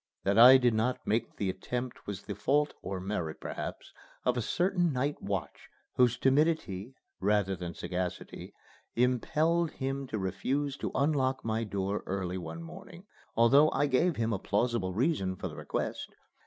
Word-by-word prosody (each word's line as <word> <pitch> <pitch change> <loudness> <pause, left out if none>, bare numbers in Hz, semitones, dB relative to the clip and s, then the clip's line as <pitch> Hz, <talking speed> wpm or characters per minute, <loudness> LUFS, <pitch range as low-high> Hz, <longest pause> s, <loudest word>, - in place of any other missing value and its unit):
That 100 +3 +3
I 125 +3 +10
did 125 -2 +3
not 115 +3 0
make 115 +2 -1
the 100 - -1
attempt 125 +5 -5
was 100 -2 -5
the - - -5
fault 145 +2 +1
or 95 -1 -4
merit, 90 -4 -3
perhaps - - -6 0.3
of 125 - +2
a 120 - 0
certain 175 - +1
night 140 +2 -1
watch, 95 -7 -4 0.3
whose 125 -2 +4
timidity, 135 - +1 0.2
rather 100 -1 +1
than 85 -2 -6
sagacity, 90 0 -4 0.4
impelled 155 +7 +2
him 135 -1 -4
to 110 - -3
refuse 135 +9 -1
to - - -3
unlock 135 -3 +1
my 110 0 0
door 100 -1 -2
early 95 -1 -2
one 130 - -7
morning, 175 +1 -11 0.3
although 135 +7 +6
I 145 - +1
gave 145 +5 +2
him 115 0 0
a 100 - -1
plausible 105 -2 0
reason 115 - +1
for - - -5
the - - -9
request. - - -3
120 Hz, 160 wpm, -30 LUFS, 100-140 Hz, 0.4 s, I